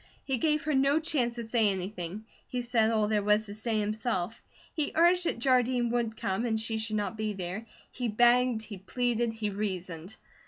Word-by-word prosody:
He 265 -3 -1
gave 305 0 +1
her 305 +1 0
no 275 +3 +4
chance 280 -7 0
to 235 - -4
say 225 -1 +2
anything; 190 +1 -4 0.2
he 250 -1 -3
said 230 -2 +2
all 215 -2 +2
there 210 -1 +1
was 210 +1 +3
to 205 - -8
say 220 +1 -1
himself; 215 -1 -2 0.3
he 305 -3 -1
urged 350 +2 +4
that - - -1
Jardine 245 -1 +2
would 235 -2 -1
come, 190 +2 -1
and 225 -2 0
she 220 0 -2
should 220 0 -2
not 205 -1 -1
be 215 -1 -1
there. 190 +4 -5 0.2
He 245 -1 -3
begged, 240 +1 +3
he 205 -3 -8
pleaded, 240 +3 0
he 220 -2 -3
reasoned. 185 -3 -4
225 Hz, 195 wpm, -29 LUFS, 210-245 Hz, 0.3 s, no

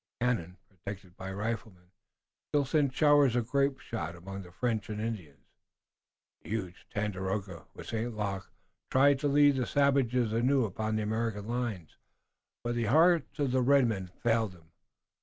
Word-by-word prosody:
The 120 - 0
cannon, 95 -7 -1
protected 95 -1 -9
by 95 - -7
the 95 - -5
riflemen, 105 -4 -5 0.6
still 145 -1 +2
sent 145 -1 +2
showers 145 -5 +5
of 120 -1 -1
grape 140 -1 +2
shot 110 -7 -5
among 95 +3 -7
the 90 -2 -12
French 110 +1 -2
and 105 0 -4
Indians. 105 -10 -5 1.0
The - - -13
huge 95 -5 -4
Tandakora 95 -3 -3
with - - -9
St. 115 0 -3
Luc 95 -3 -3 0.4
tried 140 +1 +4
to 145 - 0
lead 145 -1 +5
the 125 - 0
savages 130 -5 +2
anew 125 +2 +3
upon 110 +2 -2
the 110 - 0
American 110 -1 -2
lines, 115 -9 -3 0.7
but 120 0 -1
the 120 -1 0
hearts 160 +9 +4
of 140 -4 0
the 130 0 +2
red 135 +1 +5
men 100 -5 -2 0.2
failed 115 -4 +2
them. 80 -2 -20
115 Hz, 165 wpm, -30 LUFS, 95-130 Hz, 1.0 s, showers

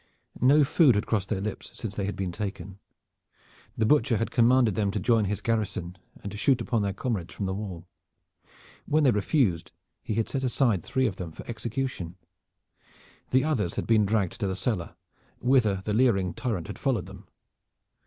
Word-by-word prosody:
No 145 +4 +6
food 140 - +4
had 105 - 0
crossed 100 -4 -1
their 110 - -1
lips 105 0 -6
since 110 -4 -5
they 100 -1 -2
had 100 - -3
been 95 -2 -3
taken. 100 0 -6 1.0
The 110 - +2
Butcher 140 -2 +3
had 115 - -2
commanded 120 -2 +4
them 100 0 0
to 105 - -2
join 115 +1 +2
his 100 +1 -2
garrison 100 -6 -2 0.3
and 100 - -5
to 105 - -7
shoot 130 +3 +3
upon 115 -3 0
their 100 -1 0
comrades 100 -3 -3
from 100 - -3
the 95 - -1
wall. 95 -4 -6 1.0
When 155 +1 +3
they 135 - +5
refused 100 - +1 0.3
he 110 - -3
had 115 0 0
set 135 -1 -3
aside 120 -6 +2
three 130 +9 0
of 100 -6 -1
them 85 -3 -6
for - - -11
execution. 115 -6 -4 1.1
The 130 +1 +3
others 115 - 0
had - - -2
been 110 -3 +3
dragged 100 -4 0
to 100 - 0
the 95 - -2
cellar, 95 -3 -2 0.4
whither 115 -7 +2
the 105 - -1
leering 105 -7 +2
tyrant 105 -10 -3
had - - -8
followed 125 - 0
them. - - -12
105 Hz, 185 wpm, -27 LUFS, 95-125 Hz, 1.1 s, No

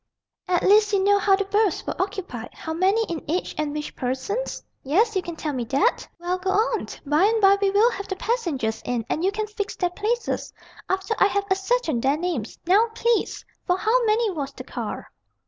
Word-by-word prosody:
"At 355 -1 +1
least 420 +1 +5
you 390 -1 +3
know 405 +1 +4
how 395 0 +4
the 400 0 -2
berths 410 -2 +1
were - - -3
occupied, 375 - -4
how 320 - -5
many 385 +7 +2
in 335 -7 -5
each, 355 +4 -1
and 305 -1 -2
which 300 0 -5
persons? 265 - -3 0.2
Yes? 410 - +2
You 380 - +2
can 345 -2 -7
tell 305 -2 -3
me 250 -2 -2
that? 275 - +1
Well, 355 +1 -2
go 380 +1 -2
on. 425 +5 +1 0.2
By 300 +6 +3
and 445 +2 +3
by 395 -1 +5
we 400 - +3
will 420 +5 +4
have 400 -3 -6
the 380 - -3
passengers 330 - -1
in, 240 -3 -2
and 320 - -1
you 385 - +3
can 430 +1 -2
fix 420 -1 -4
their 360 -2 0
places, 450 +5 -2 0.4
after 380 +3 0
I 390 - +6
have 400 0 -1
ascertained 385 - +1
their 275 +4 +2
names. 320 - -3
Now, 405 +6 +4
please! 470 -2 0 0.2
For 360 -1 +2
how 450 +6 +2
many 440 0 +2
was 285 -6 -4
the - - -8
car?" - - -6
385 Hz, 210 wpm, -24 LUFS, 320-425 Hz, 0.4 s, I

